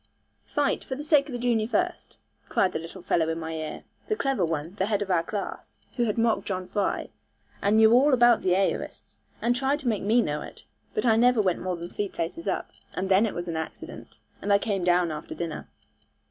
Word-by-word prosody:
'Fight, 290 -1 0
for 260 - -4
the 290 - -6
sake 295 -2 +4
of - - -6
the 245 - -3
junior 235 -3 +1
first,' 355 +8 -2 0.3
cried 185 - +2
the - - -3
little 170 +3 -9
fellow 165 -2 +1
in 165 0 -2
my 160 0 -5
ear, 155 -1 -5 0.2
the 430 - +1
clever 270 - 0
one, 160 0 -2
the 190 - +1
head 205 -2 +1
of 195 - -4
our 175 -2 +3
class, 200 +4 -6 0.2
who 240 - +1
had 215 -1 -1
mocked 230 -1 +1
John 185 -2 -3
Fry, 200 +1 -1 0.5
and 205 +2 +3
knew 220 +1 +7
all 275 +5 +5
about 240 -2 +5
the 180 -1 +2
aorists, 195 0 -2 0.2
and 240 +1 +3
tried 270 +3 +1
to 265 - -5
make 220 -4 +1
me 220 +4 +3
know 150 0 -2
it; - - -10 0.3
but 430 - 0
I 225 -2 +5
never 245 0 +4
went 185 -4 +1
more 185 0 -2
than 170 +1 -7
three 205 -1 -2
places 170 - -4
up, - - -2 0.2
and 190 +1 -2
then 195 +4 +5
it - - -5
was 175 0 -4
an 165 -1 -2
accident, 160 - -7 0.2
and 205 - -1
I 200 - +7
came 200 -3 -2
down 175 -1 +3
after 150 -1 -6
dinner. 170 -2 -5
200 Hz, 230 wpm, -26 LUFS, 175-240 Hz, 0.5 s, knew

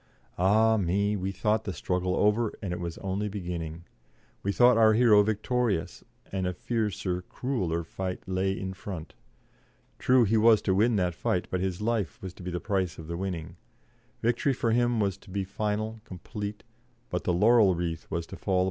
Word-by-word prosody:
Ah 110 +4 +4
me! 100 +2 +1
we 95 -1 -2
thought 105 +3 0
the 95 - -4
struggle 90 0 -1
over, 105 +2 +2
and 95 -4 -4
it - - -4
was 85 -1 -5
only 100 +2 -2
beginning; 85 -4 -5 0.6
we 100 - 0
thought 125 +3 +5
our 110 -1 +6
hero 110 -2 +6
victorious, 110 -2 -1 0.3
and 95 -1 -1
a 90 - -1
fiercer, 100 -5 -2
crueller 90 -7 -2
fight 90 +2 -4
lay 95 +1 0
in 95 0 -4
front. 90 -4 -7 0.9
True, 125 -1 +5
he 110 +1 +2
was 110 0 +6
to 95 - +2
win 110 +4 +3
that 90 -3 +1
fight, 90 +2 -1
but 90 - 0
his 95 +1 -2
life 105 -8 -1
was 95 -2 -7
to - - -14
be 90 - -5
the 90 0 -3
price 95 -3 -1
of 80 - -8
the 85 +2 -4
winning; 85 -2 -4 0.7
victory 120 +4 +2
for 120 -2 0
him 120 0 +2
was 100 -3 0
to 100 - -18
be 100 +1 -2
final, 105 +3 -2
complete, 105 +2 -7 0.5
but 90 - -2
the - - +1
laurel 105 +1 +5
wreath 85 -2 -3
was 85 -1 -2
to - - -9
fall 95 - -3
upon - - +4
a - - +4
grave. - - +4
95 Hz, 195 wpm, -28 LUFS, 90-110 Hz, 0.9 s, our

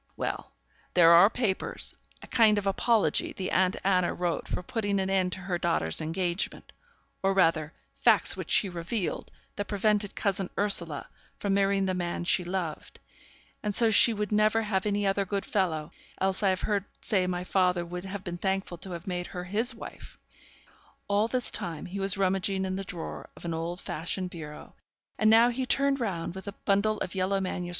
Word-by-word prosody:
Well, - - -4 0.4
there 170 -2 +7
are 175 +5 +8
papers 225 -6 -1 0.3
a - - -10
kind 220 -4 +5
of 205 - -1
apology 220 +3 +2
the 185 - -4
aunt 185 0 +2
Anna 185 -2 +2
wrote 175 -2 -2
for - - -3
putting 205 -1 -1
an 190 0 -1
end 185 -1 +2
to 190 - -5
her 180 -1 -2
daughter's 85 - 0
engagement 170 +3 -2 0.5
or 195 0 +1
rather 165 -4 +3 0.2
facts - - +3
which - - -7
she 205 - +3
revealed, 175 +3 -3 0.3
that 205 - -2
prevented 205 0 +1
cousin 195 -2 0
Ursula 175 -7 +1 0.3
from 200 -1 -1
marrying 195 0 +2
the 190 - 0
man 175 -1 -2
she 180 +1 +2
loved; 175 -3 -4 0.6
and 210 -2 -1
so 230 -2 +5
she 225 +2 +7
would 210 -2 -3
never 215 +1 +3
have 205 -1 -1
any 205 0 0
other 195 0 +2
good 195 +1 -3
fellow, 160 -7 -1 0.3
else 190 +1 +1
I 200 - +3
have 185 -1 0
heard 205 -2 0 0.2
say 190 -3 +1
my 180 0 -2
father 180 -2 +1
would 180 +2 -6
have 195 0 -6
been 175 -3 -5
thankful 190 -2 -2
to 185 0 -6
have 170 0 -7
made 180 -2 -3
her 180 - -6
his 210 +7 +1
wife.' - - -11 0.9
All 205 +2 +2
this 250 0 0
time 165 -3 -3
he 195 +3 -6
was 195 0 0
rummaging 190 0 +1
in 185 0 -2
the 195 - -3
drawer 175 -4 -7
of - - -11
an 170 - -2
old 165 +2 -4
fashioned 180 +3 -3
bureau, 150 -3 -9 0.5
and 215 - +4
now 230 +2 +6
he 255 +1 -3
turned 275 +1 +3
round, 180 -8 -3
with 190 +2 -9
a 200 - -4
bundle 210 +2 +2
of - - -3
yellow 190 +1 0
MSS. 180 -2 -3
190 Hz, 190 wpm, -28 LUFS, 180-205 Hz, 0.9 s, are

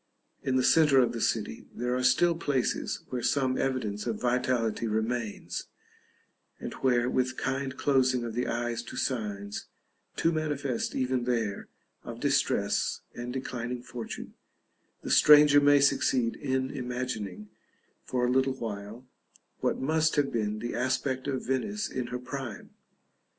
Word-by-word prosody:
In 130 - 0
the 130 - +3
centre 150 -1 +5
of 125 - +3
the 115 - -4
city 105 -2 -1
there 125 +1 -1
are 125 - 0
still 170 +7 +4
places 145 -6 -1
where 125 -1 -3
some 130 0 +1
evidence 115 -6 -2
of 110 -3 -2
vitality 120 -2 0
remains, 110 0 -2 0.9
and - - -6
where, 125 -2 +2
with 130 0 0
kind 135 0 -2
closing 130 -3 +2
of 115 -1 -4
the 125 +2 -1
eyes 120 0 -2
to 120 - -9
signs, 105 -5 -3 0.5
too 165 - +2
manifest 145 -6 -2
even 130 -1 0
there, 115 -5 -1 0.4
of - - -7
distress - - +1
and 120 +1 -5
declining 125 -1 -4
fortune, 120 -2 -7 0.7
the - - -3
stranger 150 -1 +8
may 145 0 +6
succeed 130 -4 +2
in 130 -2 -1
imagining, 120 -6 -4 0.5
for 125 -1 0
a 125 - +1
little 130 +1 +2
while, 110 0 -6 0.5
what - - 0
must 155 +3 +2
have 145 -2 +2
been 105 -2 -1
the 120 +2 -4
aspect 130 +1 -1
of 135 -2 -2
Venice 205 - -1
in 125 -2 -4
her 125 - -3
prime. 125 -3 -7
125 Hz, 145 wpm, -29 LUFS, 120-135 Hz, 0.9 s, stranger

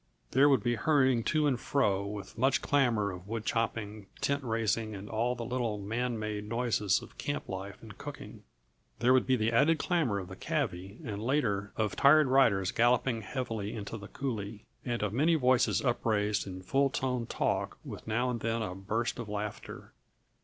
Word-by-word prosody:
There 140 +3 +5
would 135 - +3
be 120 -1 +1
hurrying 130 -2 +3
to 155 -1 +2
and 130 -4 +1
fro 100 -10 +1
with 100 -1 -7
much 130 +3 +2
clamor 120 -8 +2
of 90 +1 -9
wood 110 0 -4
chopping, 110 -2 -2
tent 140 0 0
raising 110 -2 -1
and 100 +1 -8
all 115 +4 0
the 120 -1 -5
little 120 -3 -1
man 115 +4 -2
made 105 -1 -4
noises 115 -4 +1
of - - -15
camp 145 - -3
life 95 +1 -6
and - - -10
cooking. - - -9 0.6
There 125 +2 +4
would 130 -1 +3
be 130 - +4
the 110 -1 +1
added 150 +8 +4
clamor 155 - +1
of 95 -2 -5
the - - -9
cavvy, 95 +4 -3
and 105 -3 -4
later, 110 -6 0
of 110 -3 0
tired 150 +2 +6
riders 115 -8 +3
galloping 120 0 +2
heavily 110 -2 -4
into 105 0 -5
the 105 -2 -8
coulée, 110 -6 -4 0.2
and 120 -3 -2
of 105 -1 -1
many 155 +7 +3
voices 125 -7 +3
upraised 105 -4 +1
in 95 -1 -7
full 135 +8 +2
toned 125 -3 -2
talk - - -1
with - - -8
now 120 +3 +1
and 120 - -3
then 115 0 -1
a 95 -4 -4
burst 110 +6 -2
of 115 -3 -5
laughter. 105 0 -6
115 Hz, 185 wpm, -31 LUFS, 105-130 Hz, 0.6 s, tired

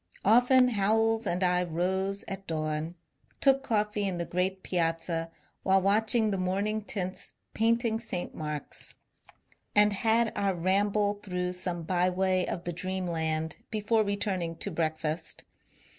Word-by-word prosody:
Often 250 +4 +6
Howells 225 +1 +2
and 180 +2 0
I 180 0 +3
rose 190 +4 -1
at 195 0 -6
dawn, 155 +1 -2 0.4
took 270 -1 +4
coffee 210 -4 0
in 185 -2 -2
the 170 - -2
great 185 +2 -1
Piazza 165 -1 -1 0.3
while 195 0 +4
watching 215 +3 +3
the 195 - -1
morning 200 +4 0
tints 185 -3 -4 0.2
painting 230 0 +2
St. 195 -6 -4
Mark's, 150 -2 -5 0.8
and 210 0 +6
had 225 +2 +2
our 200 -2 0
ramble 205 +3 +1
through 180 -2 -2
some 180 -2 -3
byway 185 +1 +1
of 175 - -4
the 175 - -3
dreamland 165 -3 -2
before 220 0 +1
returning 195 -5 -1
to 200 - -4
breakfast. 160 0 -2
190 Hz, 130 wpm, -29 LUFS, 175-210 Hz, 0.8 s, Often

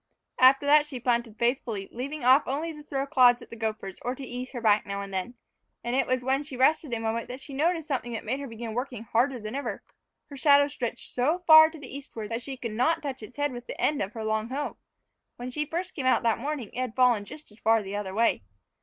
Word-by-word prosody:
After 265 +2 +6
that 295 +1 +5
she 265 -4 -6
planted 235 -2 -1
faithfully, 235 -5 -1
leaving 280 +5 -5
off 260 +4 +5
only 310 +5 -2
to 300 - -11
throw 275 -2 -3
clods 250 -3 +5
at - - -17
the - - -7
gophers, 215 -4 -4
or 250 +1 -2
to 275 - -9
ease 250 +1 -5
her 245 - -4
back 215 -2 +3
now 200 0 -4
and 200 -1 -8
then. 190 +6 -3 0.5
And 240 +2 -1
it 270 -1 +2
was 255 -1 0
when 265 +2 +1
she 280 -3 -9
was - - -3
resting 295 -2 +3
a - - -3
moment 225 +1 -2
that 250 +1 -7
she 275 +1 -10
noticed 325 +3 0
something 245 -4 -2
that 225 - -5
made 255 +5 -1
her 280 - -6
begin 230 -1 -6
working 245 -1 -4
harder 245 +3 +1
than 215 0 -6
ever. 250 -7 -4 0.5
Her 280 - -8
shadow 285 +1 +5
stretched 245 -4 -5
out 245 - +3
so 350 +4 0
far 315 -1 +9
to 320 - -11
the 275 -2 -9
eastward 230 -6 -7
that 230 +1 -2
she 270 +1 -6
could 235 -3 -5
not 255 +11 +1
touch 270 -4 -4
its 220 +5 -11
head 290 -1 0
with 245 -1 -8
the - - -7
end 300 - +1
of 200 +3 -3
her 225 -2 -5
long 220 +1 -1
hoe. 280 +3 -4 0.6
When 245 +1 -6
she 300 +3 -2
first 355 +4 -4
came 270 -6 -2
out 255 - +3
that 230 -1 +2
morning, 275 -4 -4
it - - -5
had 255 -3 -3
fallen 245 -5 +4
just 300 +5 -11
as 210 - -19
far 225 -1 +3
the 195 +1 -6
other 195 -2 -4
way. 230 +1 +2
250 Hz, 260 wpm, -27 LUFS, 225-280 Hz, 0.6 s, far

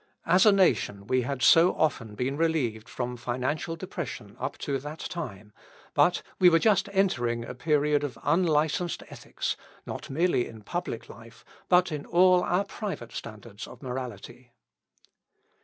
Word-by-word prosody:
As 180 +5 +5
a - - +9
nation 175 - +2
we 130 +3 +2
had 130 +1 -3
so 170 +2 +6
often 115 -9 -1
been 130 +5 -1
relieved 145 -9 0
from 125 -1 -4
financial 130 +7 -2
depression 155 - -6
up 130 +3 -4
to 140 -2 -2
that 150 +3 -7
time, 110 - -6 0.4
but, 180 0 +3 0.2
we 180 -2 +8
were 165 - +5
just 205 +1 +3
entering 120 -12 +1
a - - -6
period 150 +1 +1
of 130 -6 -4
unlicensed 165 0 +1
ethics, - - -4 0.3
not - - -7
merely 160 -3 +1
in 110 -2 -12
public 175 - -4
life, 115 -1 -14 0.2
but 180 -1 +4
in 150 -2 -5
all 180 +1 +5
our 180 +2 +1
private 195 - -6
standards 110 -1 -8
of - - -13
morality. 125 -1 -7
145 Hz, 150 wpm, -27 LUFS, 120-175 Hz, 0.4 s, a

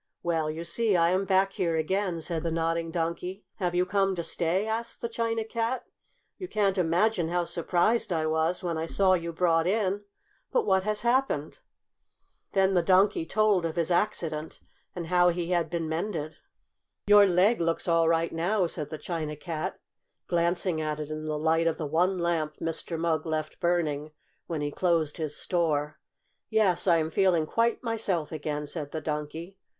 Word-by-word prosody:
"Well, 165 -3 0
you 160 +2 -4
see 220 +3 +1
I 170 0 +4
am 190 +2 +1
back 195 0 +2
here 170 -2 0
again," 175 +2 -1
said 165 0 -2
the 165 - -2
Nodding 165 0 -1
Donkey. 170 +3 -3
"Have 175 -2 -1
you 180 +1 +3
come 195 0 +1
to 170 - -3
stay?" 175 +5 0
asked 225 +1 -3
the 235 - -2
China 230 -1 -1
Cat. 230 +3 -2 0.5
"You 370 - -5
can't 200 - +1
imagine 175 +1 +2
how 175 0 +1
surprised 175 +6 +1
I 160 -2 0
was 160 +3 0
when 170 -2 -2
I 165 - -3
saw 190 +2 +3
you 170 -2 -1
brought 165 -1 +2
in! 205 0 0 0.5
But - - +2
what 190 0 +3
has 210 +1 +1
happened?" 235 - 0 0.9
Then 195 0 +3
the 180 - +4
Donkey 185 -2 +3
told 215 -3 +2
of 165 -1 -2
his 170 0 0
accident, 165 -5 -1 0.4
and 175 -2 -4
how 180 +1 +4
he 175 0 -2
had 170 -3 +1
been 170 -1 -2
mended. 160 -2 -3 0.7
"Your 205 0 +7
leg 190 +4 +3
looks 165 +1 0
all 165 -1 +3
right 165 0 +1
now," 180 +4 +1
said 155 -3 -3
the 155 - -5
China 155 -2 -4
Cat, 155 +1 -4 0.5
glancing 170 -1 0
at 155 -1 -2
it 150 0 -5
in 155 0 -5
the 155 -1 -2
light 160 +2 +2
of 165 - 0
the 155 - -3
one 175 +6 +1
lamp 165 -3 -1
Mr. 165 +1 -3
Mugg 160 -1 0
left 155 -1 -3
burning 155 -4 0 0.4
when 160 -3 -3
he 145 0 -2
closed 165 -3 +1
his 155 -3 -3
store. 155 -4 -1 0.5
"Yes, 200 -5 +2
I 170 -2 +5
am 160 0 -1
feeling 180 -3 +3
quite 230 +10 0
myself 210 -9 -1
again," 150 -2 -3
said 145 -1 -4
the 160 - -2
Donkey. 160 +5 -5
170 Hz, 180 wpm, -28 LUFS, 160-190 Hz, 0.9 s, Your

